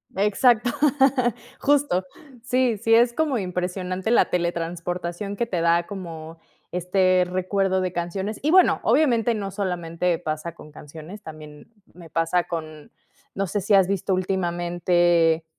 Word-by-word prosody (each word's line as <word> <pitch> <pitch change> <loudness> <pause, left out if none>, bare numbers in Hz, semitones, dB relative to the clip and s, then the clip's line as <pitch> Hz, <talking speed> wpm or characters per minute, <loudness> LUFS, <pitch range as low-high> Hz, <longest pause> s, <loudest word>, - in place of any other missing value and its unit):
Exacto. 215 +4 +3 0.9
Justo. 285 -10 +2 0.4
Sí 250 -3 +1
sí 225 +2 +1
es 235 +1 +5
como 300 -4 0
impresionante 185 +2 -3
la - - +5
teletransportación 175 +2 -3
que 235 - 0
te 180 -7 -2
da, 170 0 +2
como 165 -5 -8 0.3
este 185 +1 +2
recuerdo 190 +1 0
de 185 -1 -2
canciones. 190 +5 -4
Y 310 - +2
bueno, 370 0 +5
obviamente, 240 -6 +2
no 195 -2 -4
solamente 180 -3 -2
pasa 155 0 -4
con 155 -3 -14
canciones. 160 +7 -11
También 155 +4 -12 0.2
me 170 -2 -13
pasa 165 +2 +1
con 155 -3 -7 0.4
no 195 0 -1
sé 205 +3 -2
si 205 +2 0
has 190 -2 +5
visto 195 0 -1
últimamente, 175 -2 +1
180 Hz, 135 wpm, -23 LUFS, 170-205 Hz, 0.9 s, es